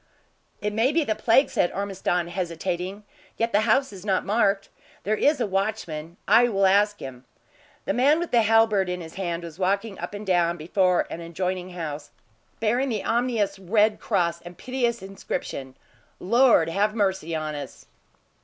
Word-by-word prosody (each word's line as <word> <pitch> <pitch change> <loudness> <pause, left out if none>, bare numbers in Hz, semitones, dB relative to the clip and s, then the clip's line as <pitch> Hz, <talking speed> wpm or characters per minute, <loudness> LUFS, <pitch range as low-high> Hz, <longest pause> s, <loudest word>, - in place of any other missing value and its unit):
"It 210 0 -2
may 225 +5 +2
be 320 +1 +2
the 220 - 0
plague," 230 +5 +3
said 175 - +1
Ormiston, 185 -3 -2
hesitating. 180 +2 -4 0.3
"Yet 230 0 0
the 205 - +3
house 265 0 +2
is 185 -2 -10
not 195 -3 0
marked. 200 -2 +1 0.3
There 215 +2 +1
is 290 +6 +2
a 240 - +1
watchman. 190 -5 -3
I 245 +1 +5
will 195 -3 +2
ask 205 +2 +3
him." 130 -2 -8 0.6
The - - 0
man 275 +5 +4
with 345 0 -3
the 235 - +5
halberd 220 -3 +3
in 180 0 -3
his 160 -2 -9
hand 175 -3 -3
was 170 +1 -9
walking 200 +2 -1
up - - -6
and 205 +1 -7
down 175 -2 +2
before 180 +3 +1
an 170 - -5
adjoining 180 +2 -3
house, 150 -4 -6 0.5
bearing 240 +5 +1
the 215 -4 -2
ominous 225 -5 0
red 210 +3 +2
cross 170 -5 0
and 175 0 -11
piteous 240 -4 -2
inscription: 160 -8 -5 0.4
"Lord 235 -4 +4
have 205 +5 0
mercy 190 -6 0
on 155 -1 -3
us!" 145 -2 -8
195 Hz, 170 wpm, -25 LUFS, 175-220 Hz, 0.6 s, I